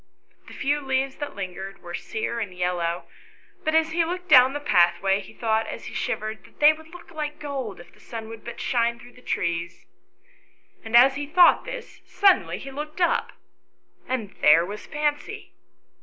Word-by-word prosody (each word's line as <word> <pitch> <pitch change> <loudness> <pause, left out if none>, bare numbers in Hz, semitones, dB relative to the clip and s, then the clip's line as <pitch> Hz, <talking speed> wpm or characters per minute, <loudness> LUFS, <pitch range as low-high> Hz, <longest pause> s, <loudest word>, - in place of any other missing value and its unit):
The - - -11
few 290 +2 0
leaves 265 0 -1
that 290 - -6
lingered 195 0 -7
were 175 - -8
sere 220 +5 -3
and 200 -5 -5
yellow, 175 -1 -1 0.6
but 315 0 0
as 320 0 +3
he 335 +1 +2
looked 360 +2 -5
down 260 -2 +7
the 290 - -3
pathway 195 -5 +3
he 190 - -13
thought, 220 -1 0
as - - -7
he - - -8
shivered, 215 +1 -3
that - - -21
they 300 +1 +7
would 315 0 -14
look 345 +1 -13
like 300 -2 -4
gold, 270 -9 -5
if 175 - -15
the - - -22
sun 225 -2 -8
would 225 -1 -10
but 235 - -8
shine 235 -2 +1
through 245 - -15
the 250 - -18
trees. 170 -5 -3 1.0
And 225 +1 +3
as 265 +3 +6
he 290 0 -4
thought 350 +3 +5
this, - - -8
suddenly 395 -2 +3
he 270 - -9
looked 305 +4 -7
up, 345 - +1 0.7
and 235 -6 -3
there 165 +3 +6
was 205 +3 -8
Fancy. 295 0 -3
255 Hz, 185 wpm, -25 LUFS, 200-300 Hz, 1.0 s, down